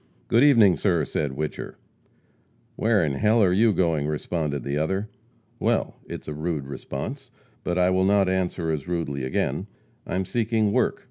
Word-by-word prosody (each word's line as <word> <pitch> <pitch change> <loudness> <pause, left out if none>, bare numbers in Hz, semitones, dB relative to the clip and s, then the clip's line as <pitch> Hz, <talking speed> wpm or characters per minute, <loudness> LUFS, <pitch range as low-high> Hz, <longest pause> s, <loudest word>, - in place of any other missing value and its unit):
"Good 115 +3 +5
evening, 115 - +6
sir," 85 -7 +1
said 75 -3 -2
Whicher. 75 +2 -5 1.0
"Where 110 -7 +2
in 70 -2 -1
h - - -5
ll 110 +1 +4
are 90 -2 +3
you 110 +4 +4
going?" 80 -6 +1
responded 75 -2 -2
the 70 +1 -2
other. 95 +8 -1 0.5
"Well, - - 0
it's - - -7
a 75 - -4
rude 75 -2 -3
response, 70 0 -6 0.3
but 90 - -1
I 90 0 +3
will 95 0 +2
not 100 -1 +3
answer 90 -3 -1
as 75 0 -3
rudely 80 -6 -2
again. 65 - -1 0.4
I - - -3
am 95 0 0
seeking 110 +1 +1
work. - - +1
90 Hz, 175 wpm, -25 LUFS, 75-100 Hz, 1.0 s, evening